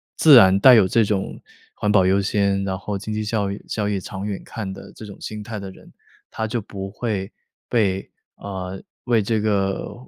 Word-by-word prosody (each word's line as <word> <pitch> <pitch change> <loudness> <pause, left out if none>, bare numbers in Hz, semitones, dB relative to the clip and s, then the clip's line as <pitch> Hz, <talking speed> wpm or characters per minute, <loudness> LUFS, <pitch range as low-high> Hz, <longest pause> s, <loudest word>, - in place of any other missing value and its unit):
自 150 -5 +8
然 95 -3 +7
带 130 -2 +9
有 105 -5 +5
这 115 +4 +3
种 100 -2 -2 0.3
环 105 - 0
保 95 -3 +4
优 95 +2 +3
先， 100 0 +1
然 95 -1 -3
后 100 0 -4
经 105 +2 -6
济 110 - -2
效 105 -2 -1
益 100 - -7
效 105 -2 -2
益 100 -2 -1
长 95 +2 -7
远 105 -2 -4
看 105 -4 -6
的 95 - -11
这 110 - -10
种 100 -2 -10
心 105 -1 -6
态 105 0 -6
的 100 -1 -7
人， - - -17 0.4
他 110 0 -3
就 115 0 -2
不 95 -1 -7
会 100 -2 -3 0.4
被 95 -5 0 0.3
啊， 95 -1 -6 0.2
为 120 -3 +2
这 110 +2 0
个 100 -2 -1
100 Hz, 220 characters per minute, -22 LUFS, 95-110 Hz, 0.4 s, 带